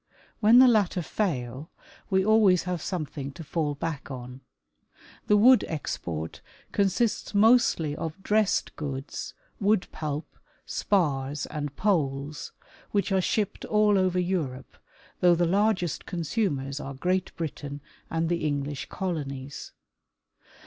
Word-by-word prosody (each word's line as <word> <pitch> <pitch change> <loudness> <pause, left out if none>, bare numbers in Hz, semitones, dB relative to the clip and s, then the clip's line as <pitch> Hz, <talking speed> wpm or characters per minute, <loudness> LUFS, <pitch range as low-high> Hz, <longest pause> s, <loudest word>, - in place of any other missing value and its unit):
When 225 +2 +6
the 255 +1 +9
latter 205 -6 +2
fail, 140 - -2 0.4
we 190 -1 +2
always 210 -5 +5
have 180 -3 -3
something 150 -6 -4
to 165 - -9
fall 150 -1 -1
back 150 -3 -4
on. 125 0 -8 0.9
The 210 - +5
wood 245 +4 +7
export 85 - -4 0.3
consists 205 +2 0
mostly 205 -9 +4
of 165 +4 -6
dressed 210 -2 +1
goods, 140 -2 -5 0.2
wood 205 -1 +2
pulp, 150 0 -5 0.3
spars 145 -7 0
and 145 -2 -5
poles, 145 -7 -1 0.4
which 205 0 0
are 190 -1 +3
shipped 205 +2 -1
all 210 -1 +3
over 185 -1 +2
Europe, 160 -9 -2 0.4
though 175 -1 +5
the 175 +1 +2
largest 190 -1 +1
consumers 155 - -2
are 140 -1 -6
Great 185 +6 0
Britain 145 -3 -5 0.3
and 165 0 0
the 170 0 -1
English 145 -1 -2
colonies. 140 -7 -4
165 Hz, 120 wpm, -27 LUFS, 140-200 Hz, 0.9 s, the